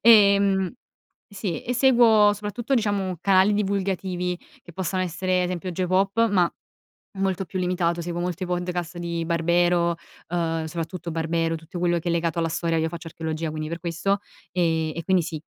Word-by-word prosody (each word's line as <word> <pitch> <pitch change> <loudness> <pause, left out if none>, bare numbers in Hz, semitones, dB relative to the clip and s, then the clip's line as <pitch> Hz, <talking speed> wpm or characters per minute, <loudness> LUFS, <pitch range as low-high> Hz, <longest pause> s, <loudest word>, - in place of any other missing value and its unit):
Ehm, 200 -3 +5 0.6
sì 195 -4 -4
e 250 - -2
seguo 235 -5 +6
soprattutto 215 +6 -2
diciamo 200 -6 0
canali 195 +1 +4
divulgativi, 190 -3 -1 0.3
che 175 - -13
possano 185 +1 -1
essere 185 +1 0
ad 180 - +2
esempio 180 0 -3
Geopop 190 +5 +2
ma 180 -4 +3 0.7
molto 195 -1 0
più 185 - -5
limitato, 175 -1 0
seguo 175 0 -3
molti 180 +1 -2
podcast 175 -1 -3
di 170 -1 -3
Barbero, 170 +1 +2 0.3
uhm, 165 -2 -1
soprattutto 170 +2 -5
Barbero, 165 0 0
tutto 165 +3 -8
quello 175 0 +2
che 170 +1 -3
è - - +2
legato 170 0 0
alla 165 -1 +1
storia, 165 0 0
io 160 0 0
faccio 170 0 -8
archeologia, 160 0 -3
quindi 155 0 -4
per 170 - -4
questo. 180 +4 -1 0.3
Uhm, 165 -3 +1
e 170 - -3
quindi 185 -2 +2
sì, 160 -2 -5
175 Hz, 165 wpm, -24 LUFS, 170-195 Hz, 0.7 s, seguo